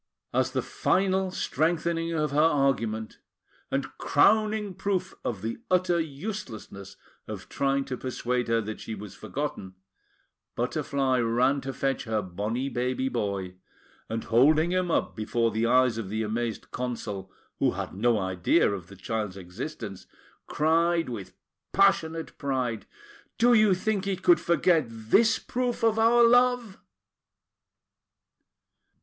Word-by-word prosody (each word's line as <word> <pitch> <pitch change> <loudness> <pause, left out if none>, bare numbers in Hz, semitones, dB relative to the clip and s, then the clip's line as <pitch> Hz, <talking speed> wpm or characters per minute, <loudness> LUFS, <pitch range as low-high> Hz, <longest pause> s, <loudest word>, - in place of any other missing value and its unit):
As - - +2
the - - -2
final 190 0 +1
strengthening 165 0 -1
of 150 -3 0
her 145 - +1
argument, 135 -8 +1 0.5
and - - -3
crowning 215 -1 +3
proof 190 0 -2
of 105 -5 -3
the 115 - -3
utter 180 -1 +2
uselessness 135 - -6 0.3
of - - -7
trying 135 0 0
to 130 -2 -4
persuade 125 -1 -2
her 115 0 +2
that 110 0 -6
she 110 - -6
was 105 -1 -9
forgotten, 115 -10 -5 0.8
Butterfly 135 -2 0
ran 125 +4 +2
to 135 - -4
fetch 135 0 -2
her 110 -2 -1
bonny 105 +8 -3
baby 130 0 -1
boy, 100 -6 -3 0.5
and, 115 0 -3
holding 155 +8 +4
him 185 -1 0
up - - 0
before 115 +1 0
the 110 +1 0
eyes 125 -2 +3
of 100 -4 -5
the 110 +2 -1
amazed 115 +1 -3
Consul, 105 -6 -4 0.3
who - - +2
had - - -5
no 115 +4 +2
idea 95 - +2
of 95 -4 -5
the 100 - -13
child's 105 0 -4
existence, 95 - -7 0.4
cried 165 +1 +2
with 105 -6 -7 0.4
passionate 165 -5 +2
pride: 130 -5 -2 0.5
"Do 240 +1 +5
you 215 -4 +5
think 200 +1 -1
he 195 -1 0
could 345 - +4
forget 170 -3 +2
this 115 - +3
proof 245 -1 -3
of 225 -1 +3
our 235 +1 +5
love?" 245 -3 +3
135 Hz, 135 wpm, -27 LUFS, 110-175 Hz, 0.8 s, Do